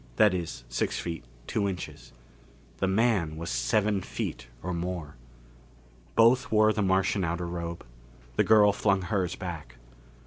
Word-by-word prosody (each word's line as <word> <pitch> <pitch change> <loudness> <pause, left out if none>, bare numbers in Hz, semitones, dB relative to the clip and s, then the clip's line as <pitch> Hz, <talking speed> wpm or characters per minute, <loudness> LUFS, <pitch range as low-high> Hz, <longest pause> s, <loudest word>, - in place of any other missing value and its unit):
That 105 -3 +5
is, 85 -9 -4
six - - -1
feet, 85 -5 -4 0.2
two 100 -2 0
inches. 90 -9 -7 0.7
The 95 - 0
man 95 -6 +1
was 85 -3 -4
seven 100 - +1
feet 65 - -5 0.2
or 90 +1 -2
more. 85 -3 -4 1.0
Both 120 +3 +4
wore 110 0 +5
the 105 - -1
Martian 95 0 +2
outer 85 +1 -1
robe. 85 0 -5 0.5
The - - +4
girl 105 -2 +6
flung 100 -2 +1
hers 90 -2 -1
back. 80 -9 -7
90 Hz, 140 wpm, -28 LUFS, 85-105 Hz, 1.0 s, girl